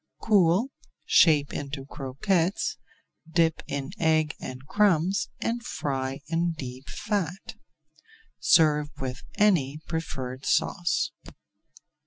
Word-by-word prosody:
Cool, 200 Hz, +4 st, +3 dB, 0.3 s
shape 150 Hz, -4 st, +5 dB
into 140 Hz, -1 st, -5 dB
croquettes, 165 Hz, +8 st, -1 dB, 0.5 s
dip 165 Hz, -1 st, +2 dB
in 140 Hz, -1 st, -4 dB
egg 155 Hz, -1 st, +2 dB
and 130 Hz, +1 st, -8 dB
crumbs, 190 Hz, 0 st, +2 dB
and 235 Hz, +1 st, -2 dB
fry 135 Hz, -, -3 dB
in 170 Hz, +1 st, 0 dB
deep 130 Hz, -3 st, -8 dB
fat. 195 Hz, -4 st, -3 dB, 0.9 s
Serve 150 Hz, -2 st, +4 dB
with 130 Hz, 0 st, -4 dB
any 175 Hz, -10 st, +3 dB
preferred 130 Hz, -6 st, -4 dB
sauce. 175 Hz, +3 st, +1 dB
160 Hz, 95 wpm, -27 LUFS, 135-180 Hz, 0.9 s, shape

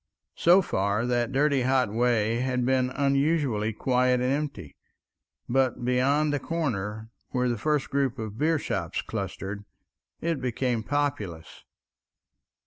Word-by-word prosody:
So 180 Hz, +3 st, +5 dB
far 100 Hz, -, 0 dB
that 120 Hz, -1 st, 0 dB
dirty 140 Hz, 0 st, +2 dB
hot 130 Hz, -4 st, +1 dB
way 115 Hz, -1 st, +2 dB
had 125 Hz, -1 st, 0 dB
been 130 Hz, 0 st, +2 dB
unusually 140 Hz, -5 st, +1 dB
quiet 125 Hz, +2 st, +2 dB
and 125 Hz, +2 st, +1 dB
empty, 140 Hz, -, -4 dB, 0.7 s
but 130 Hz, -1 st, +1 dB
beyond 140 Hz, +4 st, +2 dB
the 145 Hz, -, 0 dB
corner, 110 Hz, -10 st, -3 dB, 0.2 s
where 125 Hz, -1 st, 0 dB
the 120 Hz, -, 0 dB
first 150 Hz, +5 st, -1 dB
group 135 Hz, -3 st, 0 dB
of 110 Hz, -2 st, -4 dB
beershops 155 Hz, -1 st, -1 dB
clustered, 100 Hz, +1 st, -5 dB, 0.6 s
it 165 Hz, -5 st, -2 dB
became 125 Hz, -1 st, -1 dB
populous. 110 Hz, -, -3 dB
125 Hz, 125 wpm, -27 LUFS, 115-140 Hz, 0.7 s, So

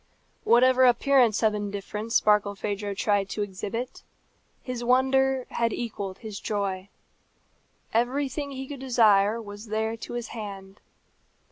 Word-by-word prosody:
Whatever 255 Hz, +2 st, +5 dB
appearance 245 Hz, -3 st, +4 dB
of 215 Hz, -1 st, +4 dB
indifference 210 Hz, +2 st, -2 dB
Barkilphedro 205 Hz, -1 st, 0 dB
tried 200 Hz, -1 st, +1 dB
to 210 Hz, -, -2 dB
exhibit, 205 Hz, +5 st, -5 dB, 0.6 s
his 250 Hz, -2 st, -5 dB
wonder 265 Hz, +1 st, +2 dB
had 230 Hz, -1 st, 0 dB
equalled 205 Hz, -5 st, -4 dB
his 215 Hz, -3 st, -7 dB
joy. 200 Hz, -2 st, -3 dB, 1.0 s
Everything 270 Hz, +4 st, 0 dB
he 265 Hz, -1 st, -6 dB
could 280 Hz, -1 st, -7 dB
desire 225 Hz, -4 st, +3 dB
was 205 Hz, 0 st, -9 dB
there 220 Hz, +1 st, -1 dB
to 230 Hz, -, -8 dB
his 240 Hz, 0 st, -4 dB
hand. 195 Hz, -3 st, -8 dB
220 Hz, 120 wpm, -26 LUFS, 205-250 Hz, 1.0 s, Whatever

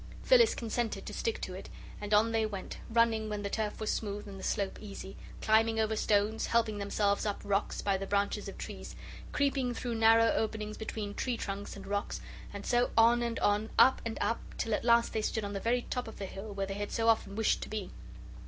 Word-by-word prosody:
Phyllis -, -, +6 dB
consented 230 Hz, 0 st, -2 dB
to -, -, -6 dB
stick 455 Hz, 0 st, -1 dB
to -, -, -4 dB
it -, -, -8 dB, 0.3 s
and 205 Hz, 0 st, -5 dB
on 215 Hz, +2 st, +5 dB
they 225 Hz, -1 st, +2 dB
went, 205 Hz, -3 st, -5 dB
running 225 Hz, -1 st, +2 dB
when 210 Hz, -1 st, -3 dB
the 200 Hz, -, -3 dB
turf 215 Hz, -2 st, -2 dB
was 215 Hz, -, -1 dB
smooth 205 Hz, -1 st, -3 dB
and 195 Hz, -1 st, -8 dB
the -, -, -9 dB
slope 195 Hz, -1 st, -1 dB
easy, 195 Hz, -2 st, -8 dB, 0.3 s
climbing 225 Hz, +1 st, +3 dB
over 220 Hz, 0 st, +1 dB
stones, 210 Hz, +1 st, +1 dB
helping 225 Hz, -3 st, +1 dB
themselves 200 Hz, 0 st, +1 dB
up 205 Hz, -2 st, -1 dB
rocks 200 Hz, 0 st, -1 dB
by 200 Hz, -1 st, +2 dB
the 195 Hz, +1 st, -5 dB
branches 200 Hz, +1 st, 0 dB
of -, -, -9 dB
trees, -, -, -7 dB, 0.4 s
creeping 270 Hz, -3 st, +1 dB
through 240 Hz, +1 st, -3 dB
narrow 225 Hz, 0 st, +5 dB
openings 215 Hz, -1 st, -2 dB
between 215 Hz, -2 st, -5 dB
tree 245 Hz, +1 st, -2 dB
trunks 200 Hz, -1 st, -5 dB
and 195 Hz, -1 st, -9 dB
rocks, 205 Hz, +1 st, -2 dB, 0.3 s
and 200 Hz, 0 st, -7 dB
so 245 Hz, 0 st, +2 dB
on 235 Hz, +1 st, +6 dB
and 235 Hz, -1 st, -1 dB
on, 210 Hz, +2 st, +2 dB
up 260 Hz, -, +6 dB
and 230 Hz, -1 st, -4 dB
up, 230 Hz, -, 0 dB, 0.2 s
till 225 Hz, -, -1 dB
at -, -, 0 dB
last 235 Hz, 0 st, +4 dB
they 220 Hz, -, 0 dB
stood 220 Hz, 0 st, -1 dB
on 200 Hz, 0 st, -4 dB
the 200 Hz, -, -2 dB
very 240 Hz, +4 st, +1 dB
top 250 Hz, -2 st, -2 dB
of 225 Hz, -, -9 dB
the 200 Hz, -, -4 dB
hill 195 Hz, +3 st, -7 dB
where 200 Hz, -1 st, -2 dB
they 195 Hz, -, -4 dB
had 205 Hz, +1 st, -4 dB
so 225 Hz, 0 st, 0 dB
often 220 Hz, -3 st, +2 dB
wished 225 Hz, 0 st, +2 dB
to -, -, -6 dB
be. 210 Hz, -3 st, -4 dB
215 Hz, 225 wpm, -31 LUFS, 205-230 Hz, 0.4 s, Phyllis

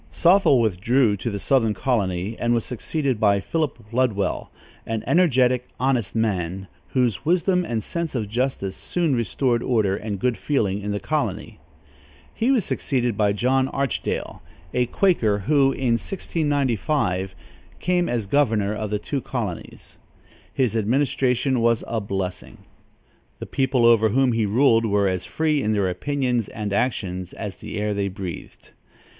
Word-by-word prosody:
Sothel 175 Hz, -6 st, +4 dB
withdrew 110 Hz, +2 st, +2 dB
to 105 Hz, -, -3 dB
the 100 Hz, -, -3 dB
southern 115 Hz, -1 st, +2 dB
colony, 100 Hz, -4 st, -1 dB
and 120 Hz, 0 st, +2 dB
was 115 Hz, -, -1 dB
succeeded 130 Hz, 0 st, -2 dB
by 100 Hz, -2 st, +3 dB
Philip 155 Hz, +7 st, -2 dB, 0.2 s
Ludwell, 115 Hz, -6 st, 0 dB, 0.3 s
an 115 Hz, -1 st, -3 dB
energetic, 130 Hz, -8 st, +3 dB
honest 125 Hz, -6 st, 0 dB
man, 95 Hz, -4 st, -1 dB, 0.2 s
whose 120 Hz, -8 st, 0 dB
wisdom 180 Hz, +2 st, +2 dB
and 115 Hz, -9 st, -3 dB
sense 170 Hz, -4 st, -4 dB
of 110 Hz, -4 st, -1 dB
justice 115 Hz, -4 st, -2 dB
soon 170 Hz, -6 st, -1 dB
restored 120 Hz, +1 st, 0 dB
order 110 Hz, -7 st, +1 dB
and 105 Hz, -1 st, -4 dB
good 125 Hz, +4 st, 0 dB
feeling 105 Hz, -9 st, 0 dB
in 105 Hz, -, -4 dB
the 105 Hz, 0 st, -1 dB
colony. -, -, -3 dB, 0.7 s
He 230 Hz, -, 0 dB
was 250 Hz, -9 st, +3 dB
succeeded 125 Hz, -5 st, -1 dB
by 105 Hz, -1 st, +2 dB
John 130 Hz, +5 st, +1 dB
Archdale, 135 Hz, -2 st, -3 dB, 0.3 s
a 125 Hz, -1 st, +1 dB
Quaker, 120 Hz, -, +2 dB
who, 135 Hz, +6 st, +3 dB
in 120 Hz, -4 st, 0 dB
1695, 135 Hz, -, -1 dB, 0.4 s
came 180 Hz, 0 st, +1 dB
as 120 Hz, -3 st, -1 dB
governor 105 Hz, -4 st, +1 dB
of 105 Hz, 0 st, -4 dB
the 105 Hz, -, 0 dB
two 140 Hz, +6 st, -3 dB
colonies. 110 Hz, -11 st, -6 dB, 0.5 s
His 125 Hz, -4 st, 0 dB
administration 130 Hz, +2 st, +1 dB
was 115 Hz, 0 st, +2 dB
a 115 Hz, -1 st, -2 dB
blessing. 95 Hz, -2 st, -5 dB, 0.7 s
The -, -, -7 dB
people 130 Hz, -3 st, +1 dB
over 115 Hz, -2 st, +5 dB
whom 130 Hz, +3 st, +3 dB
he 115 Hz, -2 st, +1 dB
ruled 115 Hz, +1 st, +4 dB
were 100 Hz, -1 st, +2 dB
as 95 Hz, -1 st, -2 dB
free 155 Hz, -2 st, 0 dB
in 110 Hz, -2 st, 0 dB
their 100 Hz, -3 st, +1 dB
opinions 125 Hz, +3 st, -1 dB
and 105 Hz, -2 st, -4 dB
actions 95 Hz, -5 st, -2 dB
as 100 Hz, -3 st, -6 dB
the -, -, -7 dB
air 105 Hz, 0 st, -1 dB
they 100 Hz, -1 st, -1 dB
breathed. 95 Hz, -3 st, -8 dB
115 Hz, 150 wpm, -23 LUFS, 100-135 Hz, 0.7 s, over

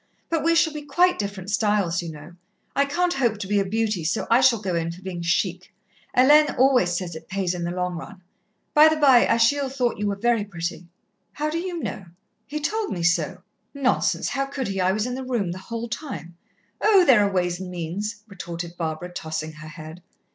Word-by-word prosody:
But 325 Hz, -3 st, +1 dB
we 335 Hz, +1 st, +3 dB
shall 325 Hz, -2 st, +3 dB
be 300 Hz, -, -5 dB
quite 350 Hz, +6 st, +2 dB
different 200 Hz, -1 st, -4 dB
styles, 205 Hz, -5 st, +1 dB
you 170 Hz, -1 st, -6 dB
know. 155 Hz, +3 st, -11 dB, 0.4 s
I 280 Hz, -, +3 dB
can't 350 Hz, +5 st, 0 dB
hope 240 Hz, -5 st, +1 dB
to 200 Hz, -2 st, -5 dB
be 205 Hz, 0 st, +2 dB
a -, -, +2 dB
beauty, 210 Hz, -2 st, -1 dB
so 155 Hz, -, -1 dB
I 235 Hz, +3 st, +6 dB
shall 260 Hz, -3 st, +5 dB
go 190 Hz, -3 st, -3 dB
in 165 Hz, 0 st, -1 dB
for 180 Hz, +3 st, -12 dB
being 180 Hz, -2 st, -5 dB
chic. 180 Hz, +2 st, -1 dB, 0.5 s
Hélène 295 Hz, +4 st, +6 dB
always 250 Hz, -10 st, +3 dB
says 175 Hz, -3 st, -5 dB
it 160 Hz, 0 st, -10 dB
pays 190 Hz, -2 st, -1 dB
in 175 Hz, -1 st, -3 dB
the -, -, -2 dB
long 180 Hz, 0 st, -2 dB
run. 195 Hz, +4 st, -9 dB, 0.5 s
By 305 Hz, +1 st, +8 dB
the 315 Hz, -, +3 dB
bye, 275 Hz, -5 st, +5 dB
Achille 265 Hz, +4 st, +3 dB
thought 255 Hz, -4 st, -1 dB
you 210 Hz, -, 0 dB
were 200 Hz, -, -1 dB
very 230 Hz, +1 st, +1 dB
pretty." 175 Hz, -3 st, -5 dB, 0.5 s
"How 300 Hz, +1 st, -2 dB
do 330 Hz, -, -1 dB
you 345 Hz, -2 st, -4 dB
know?" 195 Hz, -, -5 dB, 0.4 s
"He 300 Hz, +1 st, -4 dB
told 425 Hz, +8 st, -2 dB
me 175 Hz, -3 st, -3 dB
so." 170 Hz, +1 st, +1 dB, 0.3 s
"Nonsense! 275 Hz, -2 st, +1 dB
How 275 Hz, 0 st, -1 dB
could 270 Hz, -4 st, -4 dB
he? 195 Hz, -1 st, -2 dB
I 185 Hz, +1 st, +3 dB
was 215 Hz, +3 st, -1 dB
in 250 Hz, -, -3 dB
the 260 Hz, +1 st, -4 dB
room 235 Hz, -9 st, -1 dB
the 185 Hz, -, -6 dB
whole 230 Hz, +4 st, -5 dB
time." 220 Hz, -, -6 dB, 0.5 s
"Oh, 405 Hz, -4 st, +5 dB
there 245 Hz, -8 st, +6 dB
are 200 Hz, -, +1 dB
ways 180 Hz, -2 st, 0 dB
and 185 Hz, -1 st, -6 dB
means," 195 Hz, +5 st, -5 dB
retorted 175 Hz, -3 st, -7 dB
Barbara, 165 Hz, +2 st, -4 dB
tossing 160 Hz, -1 st, -4 dB
her 155 Hz, 0 st, -11 dB
head. 155 Hz, +2 st, -10 dB
205 Hz, 215 wpm, -24 LUFS, 175-270 Hz, 0.5 s, By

